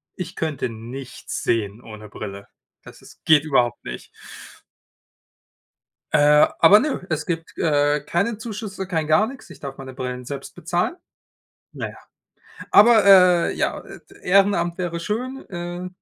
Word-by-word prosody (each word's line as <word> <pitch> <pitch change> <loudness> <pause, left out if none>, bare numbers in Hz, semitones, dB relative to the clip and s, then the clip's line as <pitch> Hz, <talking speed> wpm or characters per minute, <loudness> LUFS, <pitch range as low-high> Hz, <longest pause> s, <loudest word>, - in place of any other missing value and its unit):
Ich 180 0 -7
könnte 150 -6 -2
nichts 120 +4 -8
sehen 110 0 -1
ohne 110 -2 -11
Brille. 100 -2 -8 0.4
Das - - -14
ist - - -18
geht 155 -2 +5
überhaupt 125 -6 +1
nicht. - - -8 2.0
Äh, 150 0 +6
aber 195 +6 +8
nö, 270 -8 -2
es 155 -1 -2
gibt, 165 -2 -5
äh, 145 -1 +2
keine 195 +9 -1
Zuschüsse, 205 -4 -6
kein 160 -4 -2
gar 155 +8 +3
nix. 265 +2 -11
Ich - - -13
darf 135 -1 -8
meine 130 -1 -9
Brillen 125 -1 -5
selbst 140 +1 -7
bezahlen. 175 - -2 0.8
Na - - -5
ja. - - -15 0.7
Aber, 220 0 +6
äh, 180 -3 +6
ja, - - -1
et - - -14
Ehrenamt 180 -3 +2
wäre 175 -2 -3
schön, 250 +8 -4
äh, 175 0 -6
165 Hz, 140 wpm, -22 LUFS, 135-195 Hz, 2.0 s, aber